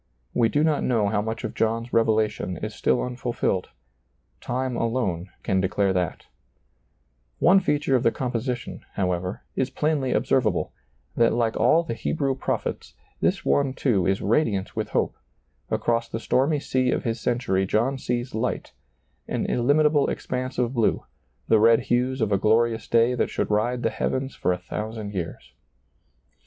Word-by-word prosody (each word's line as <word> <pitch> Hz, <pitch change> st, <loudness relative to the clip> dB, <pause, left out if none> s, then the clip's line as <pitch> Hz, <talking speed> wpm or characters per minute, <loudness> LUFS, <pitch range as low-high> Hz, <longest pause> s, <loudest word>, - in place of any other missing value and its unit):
We 115 Hz, -2 st, +3 dB
do 145 Hz, +5 st, +2 dB
not 155 Hz, -2 st, +2 dB
know 110 Hz, -5 st, +2 dB
how 105 Hz, -1 st, +1 dB
much 110 Hz, +1 st, -4 dB
of 110 Hz, -, -4 dB
John's 115 Hz, +2 st, -1 dB
revelation 110 Hz, -5 st, +1 dB
is 110 Hz, +5 st, -5 dB
still 120 Hz, -, +1 dB
unfulfilled. 120 Hz, -6 st, -2 dB, 0.7 s
Time 130 Hz, 0 st, -2 dB
alone 105 Hz, -7 st, -1 dB
can 95 Hz, -1 st, +1 dB
de 95 Hz, -, 0 dB
clare 100 Hz, -1 st, +1 dB
that 90 Hz, -3 st, -2 dB, 1.1 s
One 185 Hz, +4 st, +5 dB
feature 150 Hz, -7 st, +1 dB
of 125 Hz, -, +3 dB
the 115 Hz, -, +4 dB
composition, 125 Hz, 0 st, -3 dB
however, 90 Hz, -2 st, -2 dB
is 130 Hz, -1 st, 0 dB
plainly 145 Hz, -2 st, 0 dB
observable: 115 Hz, -4 st, +1 dB, 0.4 s
that 115 Hz, 0 st, +3 dB
like 115 Hz, -1 st, +1 dB
all 165 Hz, +1 st, +4 dB
the 165 Hz, -, -4 dB
Hebrew 135 Hz, +3 st, -1 dB
pro 130 Hz, -, -1 dB
phets, -, -, -6 dB, 0.2 s
this -, -, 0 dB
one 140 Hz, -2 st, +2 dB
too 100 Hz, -10 st, +1 dB
is 95 Hz, +1 st, 0 dB
radiant 105 Hz, -4 st, +1 dB
with -, -, -2 dB
hope; -, -, 0 dB, 0.5 s
across 115 Hz, 0 st, 0 dB
the 115 Hz, -, -4 dB
stormy 140 Hz, +6 st, +1 dB
sea 130 Hz, -2 st, 0 dB
of -, -, 0 dB
his 115 Hz, -2 st, -2 dB
century 105 Hz, -6 st, 0 dB
John 125 Hz, +7 st, +1 dB
sees 120 Hz, 0 st, -2 dB
light, 115 Hz, +3 st, -2 dB, 0.5 s
an -, -, -2 dB
illim 145 Hz, +6 st, +2 dB
itable 150 Hz, -2 st, +3 dB
expanse 130 Hz, +1 st, -4 dB
of 125 Hz, 0 st, 0 dB
blue, 115 Hz, -4 st, +1 dB, 0.4 s
the 110 Hz, -, +5 dB
red 115 Hz, +1 st, +6 dB
hues 125 Hz, +1 st, +1 dB
of 110 Hz, -2 st, +1 dB
a 100 Hz, -, +3 dB
glorious 115 Hz, +1 st, +2 dB
day 115 Hz, +1 st, +3 dB
that 125 Hz, -, 0 dB
should -, -, -2 dB
ride 120 Hz, +4 st, +1 dB
the -, -, +1 dB
heavens 130 Hz, 0 st, -2 dB
for -, -, 0 dB
a 90 Hz, -, 0 dB
thousand 105 Hz, +3 st, -5 dB
years. 90 Hz, -4 st, -6 dB
115 Hz, 165 wpm, -25 LUFS, 105-130 Hz, 1.1 s, red